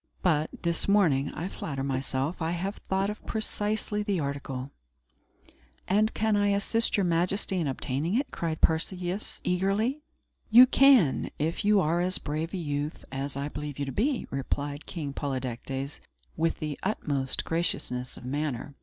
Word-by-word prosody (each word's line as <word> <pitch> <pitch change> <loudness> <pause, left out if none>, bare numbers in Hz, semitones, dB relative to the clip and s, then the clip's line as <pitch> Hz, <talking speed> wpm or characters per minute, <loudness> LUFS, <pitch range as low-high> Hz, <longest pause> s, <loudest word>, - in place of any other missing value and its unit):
But, 155 -4 +2
this 170 -1 0
morning, 165 -9 +3
I 170 - -3
flatter 140 -7 -4
myself, 135 +4 -1
I 160 +1 0
have 190 +4 -3
thought 195 +1 +1
of 210 - -9
precisely 210 -1 -1
the 205 -3 0
article." 140 -2 -4 1.2
"And 215 +3 +3
can 220 -1 +2
I 205 0 +3
assist 205 +3 +1
Your 200 - +3
Majesty 180 +2 +1
in 160 - 0
obtaining 140 +7 -1
it?" 275 +3 0
cried 160 -2 -3
Perseus, 180 +4 0
eagerly. 200 +10 +1 0.5
"You 240 +3 +10
can, 255 - +5
if 160 +7 -1
you 205 0 +5
are 170 +1 +2
as 185 +1 +1
brave 155 +3 -3
a - - -1
youth 145 -2 -3
as 135 0 -2
I 140 +1 -2
believe 150 -1 -5
you 140 - -1
to 135 - -4
be," 255 - 0
replied 140 +2 -3
King 150 -5 -4
Polydectes, 135 0 -4 0.4
with 165 +1 +1
the 150 -2 -4
utmost 145 -10 -1
graciousness 125 -7 -1
of - - -10
manner. 145 0 -2
165 Hz, 155 wpm, -28 LUFS, 140-200 Hz, 1.2 s, You